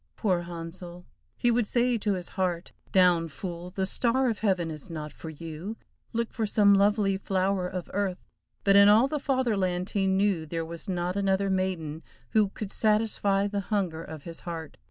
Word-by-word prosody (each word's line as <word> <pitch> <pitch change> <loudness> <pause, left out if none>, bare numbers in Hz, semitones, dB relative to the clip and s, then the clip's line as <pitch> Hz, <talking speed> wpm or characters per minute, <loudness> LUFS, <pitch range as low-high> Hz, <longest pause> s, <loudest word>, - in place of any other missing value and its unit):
Poor 185 -6 +1
Handsel! 175 +1 -8 0.3
He 240 - +3
would 235 -2 +1
say 245 +1 +2
to 205 -3 0
his 180 -1 -6
heart, 180 -2 -2 0.2
"Down, 180 -3 +4
fool, 175 +2 -6
the 190 +1 -2
star 250 +5 +2
of 220 - -5
heaven 185 -6 +1
is 155 +1 -6
not 155 -3 -6
for 160 - -8
you, 165 +7 -7 0.3
look 230 0 -2
for 220 -2 -1
some 205 -1 +5
lovely 200 0 +3
flower 190 -1 0
of 180 -1 -5
earth," 195 -2 -2 0.4
but 200 0 +4
in 200 0 +8
all 220 +5 +6
the 300 +1 -2
Fatherland 205 -10 0
he 195 -2 +1
knew 190 -4 +1
there 165 +1 -3
was 170 +4 -7
not 180 0 -1
another 195 0 +1
maiden 175 -5 -2 0.3
who 215 -2 +3
could 205 0 -6
satisfy 210 -2 +2
the 205 0 -2
hunger 180 -7 -1
of 155 -3 -9
his 165 -1 -6
heart. 165 -3 -7
190 Hz, 180 wpm, -28 LUFS, 175-205 Hz, 0.4 s, in